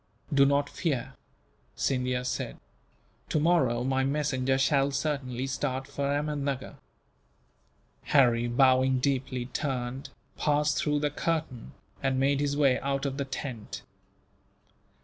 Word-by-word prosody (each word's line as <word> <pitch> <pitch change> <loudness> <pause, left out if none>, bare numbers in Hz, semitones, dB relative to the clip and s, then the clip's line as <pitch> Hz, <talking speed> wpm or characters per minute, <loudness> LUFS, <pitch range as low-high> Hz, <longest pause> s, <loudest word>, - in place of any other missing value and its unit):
"Do 140 -1 +6
not 140 0 +2
fear," 140 -8 -2 0.6
Scindia 125 -1 0
said, 125 - -3 0.7
"tomorrow 150 -7 +2
my 135 +1 +1
messenger 135 -2 +1
shall 135 0 +3
certainly 135 -3 -2
start 130 0 -2
for 140 0 -4
Ahmednuggur." 145 -2 -2 1.3
Harry, 120 -4 +4
bowing 130 +1 +4
deeply, 130 -2 -1
turned, 130 0 -3 0.3
passed 150 0 +2
through 150 -1 +1
the 150 -1 0
curtain, 145 - -3 0.3
and 135 -1 +1
made 140 +1 +2
his 145 0 0
way 140 -3 +4
out 135 +1 -1
of 135 -1 -2
the 140 - -1
tent. 130 -4 -6
135 Hz, 115 wpm, -28 LUFS, 130-145 Hz, 1.3 s, Do